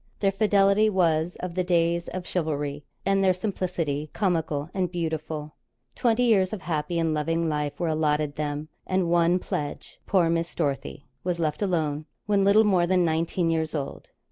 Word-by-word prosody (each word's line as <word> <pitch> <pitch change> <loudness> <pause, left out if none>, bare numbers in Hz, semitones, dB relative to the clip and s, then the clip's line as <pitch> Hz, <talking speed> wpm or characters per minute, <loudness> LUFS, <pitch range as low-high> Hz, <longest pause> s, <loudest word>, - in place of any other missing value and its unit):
Their 195 -1 +2
fidelity 200 +1 +3
was 170 -3 +1
of 180 -1 -4
the 185 +1 0
days 170 -1 +1
of 185 -1 -5
chivalry, 145 -5 -2 0.2
and 195 0 +2
their 185 -1 +4
simplicity 175 -7 -2
comical 160 -7 0
and 185 -3 -1
beautiful. 160 -3 -3 0.4
Twenty 235 - +2
years 195 -6 +3
of 205 -3 -5
happy 170 +1 -2
and 165 -1 +1
loving 165 +2 0
life 150 -2 -2
were 175 - 0
allotted 150 -2 0
them 150 +1 -3 0.2
and 185 -2 +1
one 175 +1 +4
pledge 145 -5 -5
poor 180 -4 +3
Miss 165 0 -1
Dorothy 140 -2 -2 0.2
was 180 -1 -1
left 155 -1 -1
alone, 155 -6 -1 0.2
when 205 -2 +2
little 200 +3 +6
more 185 -5 +3
than 180 -1 +3
nineteen 165 +1 0
years 160 -1 -1
old. 140 -2 -5
170 Hz, 170 wpm, -26 LUFS, 155-185 Hz, 0.4 s, little